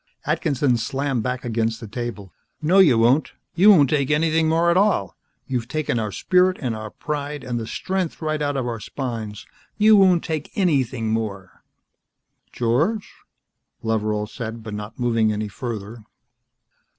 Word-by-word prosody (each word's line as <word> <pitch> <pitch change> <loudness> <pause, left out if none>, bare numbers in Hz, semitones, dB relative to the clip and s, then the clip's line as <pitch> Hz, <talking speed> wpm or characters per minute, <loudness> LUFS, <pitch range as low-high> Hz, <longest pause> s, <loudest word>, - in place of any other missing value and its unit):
Atkinson 140 -6 +1
slammed 135 +2 -1
back 125 +2 -3
against 115 -1 -1
the 115 - -8
table. 105 -4 -6 0.3
"No, 170 +5 +3
you 155 -11 +6
won't. 125 +6 +3 0.2
You 190 +5 +6
won't 150 -10 +6
take 140 -3 +1
anything 160 +1 +2
more 165 +2 +3
at - - +2
all. 200 +2 +2 0.3
You've 125 -3 -3
taken 155 -4 -1
our 105 -2 -2
spirit 185 - +2
and 125 -5 -2
our 110 0 -6
pride 150 +2 -5
and 120 -2 -3
the 110 - -5
strength 185 +3 -3
right 155 -1 -2
out 145 -1 -1
of 130 - -1
our 115 -2 -3
spines. 110 -4 -5 0.3
You 215 0 +6
won't 185 -4 +5
take 155 -2 -3
anything 130 - +1
more!" 100 -4 -4 0.9
"George?" 150 - 0 0.7
Loveral 110 -1 0
said, 115 0 -7
but 110 -1 -7
not 105 +1 -7
moving 115 -3 +2
any 105 0 -2
further. 110 0 -6
125 Hz, 155 wpm, -22 LUFS, 115-155 Hz, 0.9 s, you